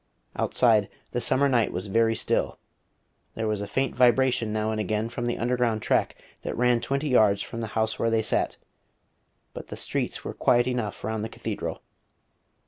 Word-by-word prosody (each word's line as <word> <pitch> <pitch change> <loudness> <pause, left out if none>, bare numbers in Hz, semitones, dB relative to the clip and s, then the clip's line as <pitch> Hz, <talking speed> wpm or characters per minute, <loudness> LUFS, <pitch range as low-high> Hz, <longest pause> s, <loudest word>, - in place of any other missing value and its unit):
Outside, 110 -5 +3 0.2
the 120 - -2
summer 140 +3 +2
night 120 -5 +2
was 90 +3 -3
very 115 +3 +2
still. - - -1 0.8
There 110 0 -2
was 105 -1 -1
a 100 - -4
faint 135 +4 -1
vibration 125 -2 +3
now 110 0 -1
and 110 - -2
again 105 +2 -1
from 120 0 -4
the 120 - -1
underground 120 -2 0
track - - +1 0.3
that - - -4
ran 120 -1 +3
twenty 140 +2 -1
yards 105 -5 +4
from 115 - -6
the 115 - -3
house 110 0 +1
where 115 - +2
they 115 -1 +1
sat; - - 0 1.0
but - - -8
the - - -7
streets - - -2
were - - -4
quiet 120 0 +3
enough 125 -4 -3
round 110 -1 -2
the 110 - -4
Cathedral. - - -5
115 Hz, 180 wpm, -26 LUFS, 110-125 Hz, 1.0 s, yards